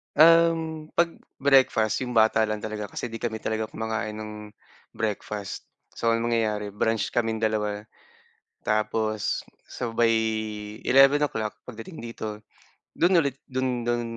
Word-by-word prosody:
Um, 165 0 +5
’pag 170 0 +3 0.3
breakfast, 130 -6 +4
’yong 125 -2 -4
bata 110 0 +5
lang 105 -1 -3
talaga 105 -1 -4
kasi 120 - -5
’di 115 - -6
kami 110 -1 -3
talaga 110 0 -1
kumakain 110 -1 -3
ng 105 0 -6 0.6
breakfast. 105 -2 -4 0.3
So, 115 0 +2
ang 115 - 0
mangyayari 110 -3 0
brunch 110 +2 0
kaming 115 -2 0
dalawa, 105 -1 0 0.8
tapos 110 0 0 0.2
sabay 115 -1 +1 0.7
11:00, 135 -4 +4
pagdating 125 +8 -9
dito, 110 -2 -6 0.5
do'n 175 +2 +4
ulit 140 -1 -3
do'n 130 -2 -1
do'n 120 0 +1
115 Hz, 125 wpm, -26 LUFS, 110-130 Hz, 0.8 s, Um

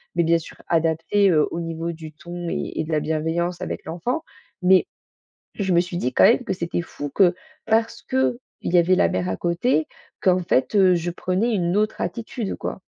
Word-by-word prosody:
mais 170 - +3
bien 170 +1 +4
sûr 165 - -10
adapté, 165 +5 +2
heu, 155 -3 +3
au 170 - -3
niveau 165 0 -3
du 160 -1 -9
ton 175 +2 -7
et - - -3
et - - +1
de 160 - -6
la 155 - +2
bienveillance 165 +3 -1
avec - - -4
l'enfant. 175 - -3 0.4
Mais 185 0 +5 0.7
je 190 -3 -1
me 170 - +4
suis 175 0 -4
dit, 130 -6 -1
quand - - +5
même, 240 - +5
que 235 - -2
c'était 170 -1 -2
fou 145 -4 -7
que 180 -3 +5 0.3
parce 225 +1 +1
qu'il 260 -2 0 0.3
y 180 - +2
avait 175 +2 +4
la 85 - +4
mère 90 +1 -1
à 95 - -1
côté, 170 0 +1 0.3
qu'en 185 -1 +3
fait, 170 -1 +1
heu, 190 -3 +5
je 170 +1 -2
prenais 185 +7 0
une 175 -1 0
autre 215 +1 0
attitude, 230 -2 -3
quoi. - - -5
175 Hz, 205 wpm, -23 LUFS, 165-195 Hz, 0.7 s, Mais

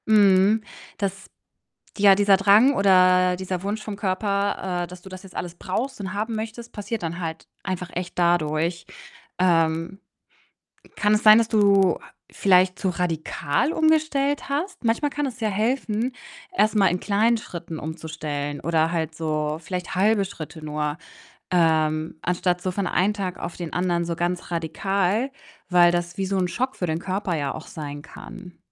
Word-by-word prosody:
Mhm. 205 0 +5 0.4
Das 195 -2 -3 0.7
ja, 200 -1 +7
dieser 200 0 +4
Drang 210 +8 +5
oder 185 -2 +4
dieser 185 -1 -4
Wunsch 205 +2 -3
vom 210 -2 -6
Körper, 200 -2 -1
äh, - - -5
dass 180 +1 -11
du 190 - -12
das 185 -1 -10
jetzt 195 -2 -14
alles 175 -1 -5
brauchst 230 +10 -3
und 190 -2 -5
haben 215 +3 -2
möchtest, 225 +2 -6
passiert 215 0 -4
dann 170 +1 -4
halt 160 -2 -5 0.2
einfach 185 -2 -4
echt 180 0 -5
dadurch. 170 0 +1 0.5
Ähm, 165 0 +1 1.0
kann 210 0 +3
es 210 - +1
sein, 215 0 +9
dass 230 -1 +3
du 200 -4 +4
ha - - -15 0.2
vielleicht 185 -1 +3
zu 195 - -1
radikal 170 - -1
umgestellt 310 -3 +1
hast? 310 +6 -3
Manchmal 235 +6 +1
kann 290 +1 -2
es 250 - -8
ja 220 - +1
helfen, 225 +2 -1 0.4
erst 215 -5 +3
mal 200 -2 +5
in 180 +1 0
kleinen 220 +3 +2
Schritten 170 -6 -7
umzustellen 150 -2 -5
oder 165 -1 +1
halt 160 -1 -2
so 155 -1 -2
vielleicht 180 +2 -5
halbe 205 +2 +3
Schritte 160 -4 -9
nur, 150 0 -2 0.6
ähm, 160 -2 +2
anstatt 180 0 0
so 185 - -2
von 195 0 -2
einen 200 +4 +1
Tag 190 -3 -4
auf 170 - -6
den 170 -3 -6
anderen 175 -1 0
so 170 0 -2
ganz 175 +1 -2
radikal, 195 - 0 0.4
weil 175 -1 +6
das 175 0 -2
wie 195 - -1
so 195 +1 -1
'n 185 -1 +1
Schock 255 +7 -2
für 180 - -2
den 160 -1 -1
Körper 185 -1 -2
ja 145 -2 -2
auch - - -8
sein 145 -2 -7
kann. 180 +1 -12
185 Hz, 170 wpm, -24 LUFS, 170-210 Hz, 1.0 s, sein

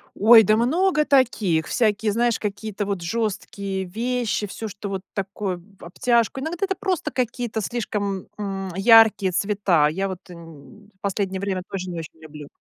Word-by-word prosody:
Ой, 225 +2 +8
да 215 +2 +3
много 305 +6 +2
таких! 215 - +2
Всякие, 215 -2 +1
знаешь, 235 +2 +1
какие-то 205 0 -4
вот 195 -3 -3
жесткие 200 -1 -3
вещи, 230 +2 -2
всё, 220 +3 -6
что 200 0 -7
вот 195 -1 -3
такое 195 -1 -3
в 190 +3 -19
обтяжку 235 +7 0
иногда 330 +7 -2
это 385 -1 -2
просто 365 -4 -1
какие-то 240 -2 -2
слишком, 205 -3 -3
м, 195 -2 -4
яркие 210 -2 +6
цвета. 195 -5 +2
Я 190 +5 -2
вот 185 -1 -8
н 170 +4 -14
последнее 195 -1 -2
время 195 -2 -2
тоже 185 -1 -4
не 170 -2 -5
очень 160 0 -10
люблю. 150 -2 -10
205 Hz, 155 wpm, -23 LUFS, 190-230 Hz, -, Ой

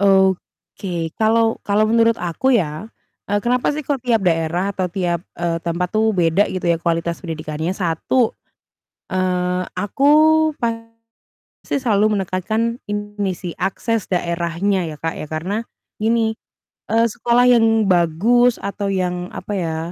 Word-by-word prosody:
Oke, 190 -3 0
kalau 225 +1 +2
kalau 205 +1 +3
menurut 230 0 +4
aku 210 +10 +1
ya, 170 -1 -1 0.4
eee, 205 0 0
kenapa 250 +4 +1
sih 305 - -3
kok 280 -1 -1
tiap 230 -4 +1
daerah 175 +2 +1
atau 185 -2 -2
tiap, 175 -1 -2
eee, 170 -1 -1
tempat 170 +1 -2
tuh 220 0 +2
beda 175 +2 +3
gitu 180 -2 -1
ya 165 - +2
kualitas 170 0 -1
pendidikannya? 160 0 -4
1, 195 +7 +1 0.8
eee, 180 -1 0
aku 210 +7 -2 0.6
pasti 230 0 -5 0.7
selalu 215 -3 +2
menekankan 220 +6 -2
ini 205 -1 -2
sih 175 -3 -6
akses 210 +3 -2
daerahnya 170 +1 -1
ya, 155 - -8
Kak, 165 0 -3
ya 155 - -7
karena 170 +7 -2 0.5
gini, 225 0 +2 0.6
eee, 230 +1 +4
sekolah 240 +2 +3
yang 225 -3 +4
bagus 200 +8 +3
atau 200 0 -4
yang 180 -1 -2
apa 210 - -6
ya, 165 -3 -2
195 Hz, 135 wpm, -20 LUFS, 170-225 Hz, 0.8 s, menurut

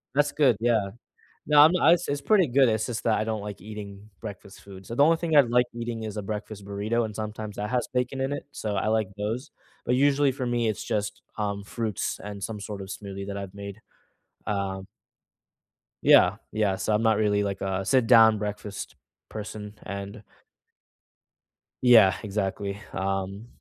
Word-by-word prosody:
That's 145 0 +3
good, 130 -8 +3
yeah. 110 -4 +1 0.6
No, 150 0 +6
I'm 155 +3 +8
I 165 - +6
it's 145 -5 0
pretty 190 +1 +4
good, 130 0 +4
it's 110 -1 0
just 120 -3 -4
that 115 -2 +2
I 110 - 0
don't 110 -2 -3
like 105 -3 -7
eating 105 0 -9
breakfast 100 -2 -9
food, 95 -1 -12
so 115 - -5
the 140 +4 +5
only 165 +1 +5
thing 165 -3 0
I 145 - +11
like 125 0 +2
eating 115 -1 -4
is 110 -1 -6
a 105 - -3
breakfast 105 0 -6
burrito, 105 +4 -1
and 110 - -5
sometimes 105 -1 -5
that 105 0 -3
has 125 -2 0
bacon 125 +1 -1
in 135 +2 -1
it. 145 - -5
So, 105 -2 -3
I 95 - -1
like 110 -2 +1
those, 115 +7 -3 0.3
but 125 - +1
usually, 140 +1 +3
for 130 -2 -4
me, 120 -2 0
it's 105 - -2
just, 105 -1 -3
um, 100 -2 -2
fruits 110 -1 -3
and 100 -1 -7
some 105 0 -4
sort 105 -1 -6
of 95 - -7
smoothie 100 0 -7
that 100 - -5
I've 100 -1 -6
made. 100 +1 -8 0.7
Um 95 -1 -3 1.2
Yeah, 95 +4 +6
yeah, 105 -3 +1
so 105 +3 -1
I'm 105 - +2
not 110 -2 +3
really, 105 -1 +2
like, 100 -1 -3
a 95 0 -1
sit-down 115 -1 +5
breakfast 105 -1 -5 0.3
person, 105 -1 -7
and 100 +2 -7 1.6
Yeah, 110 -7 +7
exactly, 100 0 -3
um 95 +2 -3
105 Hz, 185 wpm, -26 LUFS, 100-120 Hz, 1.6 s, I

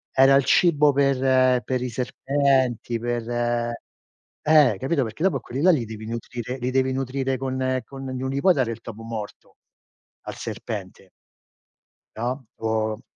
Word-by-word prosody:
e 130 - +4
era 135 0 +7
il 140 - +4
cibo 150 -4 +4
per 130 -2 +3
per 130 -1 -2
i 125 - -2
serpenti, 130 -1 0
per 120 -1 -3
eh, 120 +2 0
capito! 135 0 0
Perché 110 +9 -5
dopo 180 -8 +3
a - - -10
quelli 130 +3 -5
là, 185 +3 +6
li 130 -8 +1
devi 110 0 -8
nutrire 120 +2 -5
li 125 - -1
devi 130 0 +1
nutrire 135 0 -2
con 130 0 -1
con 135 -1 -9
non 130 0 -3
gli 140 - -1
puoi 185 -2 +5
dare 125 -4 0
il 115 0 -7
topo 115 -1 -9
morto 110 -2 -7 0.7
al - - -6
serpente. - - -7 1.1
no, 125 +3 -3
o 110 0 -1
130 Hz, 160 wpm, -24 LUFS, 120-135 Hz, 1.1 s, era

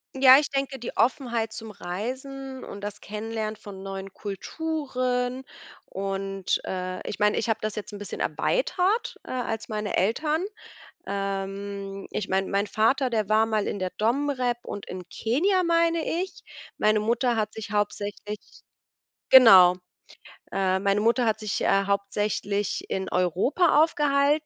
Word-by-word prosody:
Ja, 265 0 +9
ich 295 - -2
denke, 275 -1 -2
die 240 - -6
Offenheit 235 -3 +1
zum 220 0 -8
Reisen 260 +8 -6
und 200 - -8
das 205 0 -6
Kennenlernen 215 +1 -4
von 195 -2 -10
neuen 195 0 -6
Kulturen 255 - -2 0.4
und, 195 -1 -2
äh, 185 0 -4
ich - - -5
meine, 210 0 +3
ich 230 - -1
habe 220 0 +1
das 215 -1 -3
jetzt 210 0 -6
bisschen 205 0 -6
erweitert, 440 -3 0
äh, - - -8
als 230 -3 -3
meine 210 -1 -3
Eltern. 300 - +1 0.6
Ähm, 195 0 -4
ich 205 - -3
meine, 190 0 0
mein 200 +1 +1
Vater, 250 +5 +2
der 215 -4 0
war 215 +1 +4
mal 215 -2 0
in 205 - -3
der 185 -1 -2
DomRep 250 +1 0
und 200 - -6
in 180 -1 -8
Kenia, 365 - +1
meine 335 -1 +2 0.2
ich. 380 - -8 0.4
Meine 215 0 +3
Mutter 235 +2 +1
hat 215 -1 -1
sich 220 -1 -7
hauptsächlich 205 0 -2 0.9
genau, 190 -9 +9 0.8
äh, 190 -1 +1
meine 200 +1 +1
Mutter 235 +3 +3
hat 220 -1 +1
sich, 215 -2 -2
äh, 195 0 +3
hauptsächlich 200 0 -1
in 190 0 -2
Europa 260 - +3
aufgehalten. 295 -1 +2
215 Hz, 145 wpm, -26 LUFS, 200-260 Hz, 0.9 s, Ja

